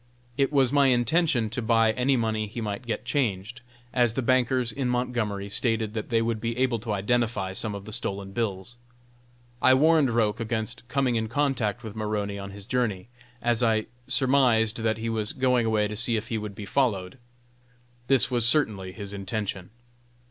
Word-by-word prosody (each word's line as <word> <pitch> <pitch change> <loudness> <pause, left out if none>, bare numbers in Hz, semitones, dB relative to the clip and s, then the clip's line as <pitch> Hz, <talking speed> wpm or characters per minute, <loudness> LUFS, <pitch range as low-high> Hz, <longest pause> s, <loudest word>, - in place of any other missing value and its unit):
It 135 +1 +1
was 135 -3 +3
my 140 -1 +5
intention 125 -2 +2
to 125 +1 -3
buy 115 -1 +3
any 125 +4 +1
money 110 -2 -1
he 110 +4 -7
might 110 +2 -4
get 115 - -3
changed, 115 -5 -2 0.3
as 120 -2 +2
the 130 - -1
bankers 125 -1 +2
in 130 +2 -2
Montgomery 120 -5 -1
stated 110 0 -1
that 110 -2 -4
they 115 -1 +2
would 115 -1 -2
be 115 +1 -2
able 130 -3 +1
to 110 +1 -5
identify 105 -1 0
some 105 +2 -3
of 100 0 -8
the 110 - -8
stolen 100 -4 -3
bills. 105 0 -3 0.8
I 130 - +6
warned 155 0 +4
Roch 115 -2 +1
against 115 +1 -3
coming 130 -2 +1
in 110 0 -1
contact 125 -3 -1
with 110 -1 -7
Maroney 105 -2 -2
on 100 0 -6
his 100 0 -9
journey, 115 -5 -1 0.3
as 120 -1 +2
I 110 -2 +2 0.2
surmised 125 -5 +3
that 110 -1 0
he 115 +1 -4
was 110 -2 -2
going 125 -3 +2
away 105 -1 +2
to 105 - -6
see 120 +1 +1
if 110 +1 -5
he 110 - -1
would 105 -2 -6
be 105 - -7
followed. 105 -2 -1 0.9
This 130 -2 +3
was 120 -2 +3
certainly 110 -9 +2
his 100 -1 -7
intention. 100 -2 -4
115 Hz, 185 wpm, -26 LUFS, 105-125 Hz, 0.9 s, I